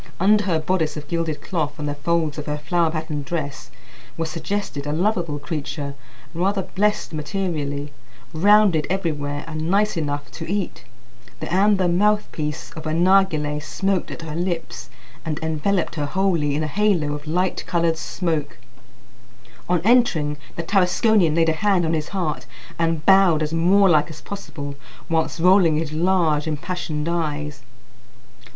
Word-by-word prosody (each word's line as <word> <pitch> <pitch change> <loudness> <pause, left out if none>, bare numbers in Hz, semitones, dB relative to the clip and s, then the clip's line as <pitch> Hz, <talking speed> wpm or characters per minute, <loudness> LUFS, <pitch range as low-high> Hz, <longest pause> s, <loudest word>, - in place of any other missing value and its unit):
Under 205 +2 +4
her 175 -4 +2
bodice 160 -1 -1
of 150 -1 -7
gilded 165 -2 -2
cloth 155 -5 -2
and 150 -1 -4
the 145 - -1
folds 155 +1 -1
of 150 - -7
her 150 0 -1
flower 170 +2 +1
patterned 155 -2 -3
dress 145 -2 -4 0.5
was 165 -1 -2
suggested 165 -3 -3
a - - -1
lovable 170 -2 0
creature, 145 -1 -4 0.4
rather 190 +3 0
blessed 210 0 -1
materially, 150 -3 -3 0.4
rounded 195 -1 +4
everywhere, 150 -6 -2
and 155 0 -4
nice 205 +3 +2
enough 145 -3 -3
to 165 +1 -6
eat. 195 -10 -3 0.5
The - - -5
amber 195 -1 +4
mouthpiece 175 -5 0
of 160 -1 -7
a 155 - -1
narghileh 170 -5 +3
smoked 190 +4 -1
at 165 - -7
her 155 -1 -6
lips, 170 -1 -3 0.3
and 155 -2 -3
enveloped 160 +4 0
her 150 -3 -2
wholly 165 -4 +1
in 155 - 0
a - - -1
halo 175 -4 +1
of 150 +1 -7
light 180 +4 0
coloured 170 -2 +1
smoke. 160 -4 -2 1.1
On 180 -2 +2
entering, 185 -11 +3 0.2
the 170 - -3
Tarasconian 185 -1 +3
laid 165 -1 +3
a - - +2
hand 185 +1 +2
on 160 - 0
his 155 -1 -1
heart 170 -10 -3 0.3
and 165 -2 0
bowed 190 -5 +5
as 155 +1 -3
Moorlike 170 -2 +4
as 160 - -10
possible, 150 -8 -7 0.4
whilst 165 0 0
rolling 180 -2 +5
his 155 -1 -2
large 165 -3 +2
impassioned 155 -1 -3
eyes. 150 -5 -2
165 Hz, 150 wpm, -22 LUFS, 150-185 Hz, 1.1 s, bowed